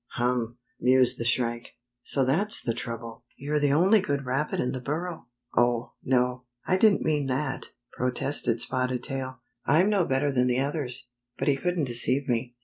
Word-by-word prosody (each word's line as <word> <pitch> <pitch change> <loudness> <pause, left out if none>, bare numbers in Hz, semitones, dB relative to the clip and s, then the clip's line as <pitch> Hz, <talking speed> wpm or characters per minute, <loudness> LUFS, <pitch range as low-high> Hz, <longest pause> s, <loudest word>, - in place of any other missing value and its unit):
Hum! 120 -1 -1
" - - -41
mused 125 0 +4
the 115 - -3
Shrike. 120 -1 -1
" - - -59
So 135 +2 +2
that's 190 +11 +4
the 115 - -2
trouble! 115 -1 -7
You're 150 +2 -1
the 145 -1 +2
only 190 +8 +5
good 140 -6 -2
rabbit 135 +4 -1
in 125 - 0
the 130 -1 -5
burrow?" 160 +2 -4
" 120 - -23
Oh, 120 -1 +1
no, 125 0 0 0.2
I 185 - +2
didn't 210 0 +4
mean 150 -3 0
that," 135 +1 -2 0.2
protested 125 -1 0
Spotted 125 -1 -1
Tail. 130 -2 -5 0.2
"I'm 180 +7 +3
no 195 -4 +2
better 135 +2 +1
than 125 -1 +2
the 125 0 +1
others, 135 -3 -2 0.3
but - - -3
he 140 - +4
couldn't 175 +3 -1
deceive 130 +2 +1
me. 120 0 -2
130 Hz, 185 wpm, -26 LUFS, 125-145 Hz, 0.3 s, only